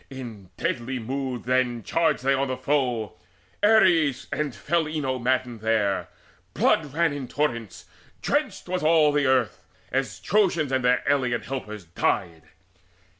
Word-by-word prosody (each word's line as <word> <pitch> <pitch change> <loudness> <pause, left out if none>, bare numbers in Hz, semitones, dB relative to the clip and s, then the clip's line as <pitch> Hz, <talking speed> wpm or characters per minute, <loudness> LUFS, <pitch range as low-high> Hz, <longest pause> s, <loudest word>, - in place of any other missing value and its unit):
In 115 -8 -9
deadly 125 +2 -2
mood 130 +1 -4
then 125 -2 0
charged 160 -1 +1
they 135 +1 +3
on 135 +1 0
the 130 0 -3
foe. 125 -7 -1 0.4
Ares 185 - +4
and 150 -6 -2
fell 165 - 0
Enyo 140 -5 -2
maddened 125 -1 0
there: 110 -3 0 0.5
Blood 150 -4 +2
ran 165 +1 +1
in 140 -3 -5
torrents, 120 -7 -3 0.3
drenched - - -1
was 180 0 -2
all 155 -1 +4
the 145 -1 +1
earth, 130 -4 +1 0.3
As - - -2
Trojans 175 -8 +1
and 130 -1 +1
their 125 0 +3
alien 130 -4 +1
helpers 105 -7 -6
died. 85 0 -2
130 Hz, 140 wpm, -25 LUFS, 120-150 Hz, 0.5 s, Ares